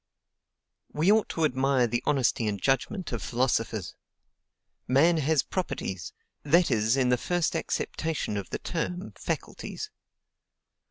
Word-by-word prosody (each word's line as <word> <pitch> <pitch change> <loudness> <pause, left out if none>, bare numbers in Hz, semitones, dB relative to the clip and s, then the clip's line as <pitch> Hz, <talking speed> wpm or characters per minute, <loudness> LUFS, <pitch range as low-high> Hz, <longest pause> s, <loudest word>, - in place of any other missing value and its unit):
We 160 +6 +3
ought 220 0 +3
to 165 - +1
admire 130 -2 +2
the 120 +1 -1
honesty 125 -5 +2
and 100 -1 -1
judgment 165 - 0
of 120 - -3
philosophers! 115 -6 0 0.9
Man 160 +6 +4
has 155 -1 +2
properties; 95 - -3 0.3
that 170 +2 +3
is, 110 +2 +2
in 130 -2 +3
the 125 - +4
first 175 +2 0
acceptation 160 -9 -2
of 100 -2 -4
the - - -2
term, 180 +2 -3
faculties. 430 - -5
135 Hz, 125 wpm, -28 LUFS, 120-165 Hz, 0.9 s, Man